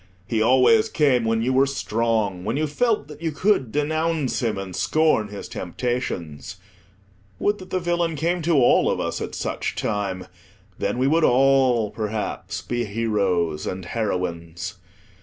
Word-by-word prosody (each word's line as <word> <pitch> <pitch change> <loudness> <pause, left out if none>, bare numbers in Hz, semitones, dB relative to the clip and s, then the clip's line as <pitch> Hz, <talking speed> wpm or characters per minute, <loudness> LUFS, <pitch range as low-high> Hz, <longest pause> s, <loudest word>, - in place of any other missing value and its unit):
He 110 0 -1
always 130 - +5
came 135 - +2
when 115 0 +1
you 130 +2 +1
were 135 +1 +4
strong, 110 -7 -1
when 115 +7 -1
you 155 - +1
felt 210 - 0
that 150 0 -12
you 165 -1 -1
could 155 - +1
denounce 155 0 0
him, 110 -4 0
and 95 -2 -6
scorn 155 -9 +2
his 100 0 -8
temptations. 90 - -4 0.8
Would 205 +1 0
that 185 - -11
the 185 - 0
villain 170 -1 0
came 170 +4 0
to 165 +1 +1
all 125 -3 +4
of - - -1
us - - -3
at - - -5
such - - -3
time; 95 -3 -2 0.5
then 100 +4 -1
we 130 - +1
would 160 +4 +3
all, 130 -4 +4
perhaps, 110 -1 -4
be 120 0 -2
heroes 100 -7 0
and 95 -1 -4
heroines. 90 -4 -3
120 Hz, 160 wpm, -23 LUFS, 100-155 Hz, 0.8 s, always